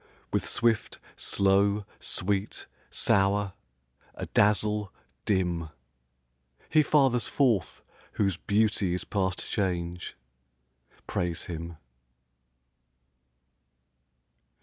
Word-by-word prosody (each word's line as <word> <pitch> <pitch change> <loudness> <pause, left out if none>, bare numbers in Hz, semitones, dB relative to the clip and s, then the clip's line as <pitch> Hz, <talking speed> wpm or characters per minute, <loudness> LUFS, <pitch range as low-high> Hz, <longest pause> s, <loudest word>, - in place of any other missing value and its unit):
With - - 0
swift, 115 -2 +1 0.2
slow; 100 +1 +2
sweet, 100 +2 -1 0.2
sour; 100 0 +2 0.6
adazzle, 105 0 +1 0.4
dim; 90 -5 0 1.0
He 155 - +6
fathers 135 -5 +3
forth 120 -9 +1 0.3
whose 100 -4 +1
beauty 100 -1 +1
is 90 - -3
past 95 -3 -2
change: 90 -3 -2 0.9
Praise 85 -2 -2
him. 85 -1 -6
100 Hz, 70 wpm, -28 LUFS, 90-105 Hz, 1.0 s, He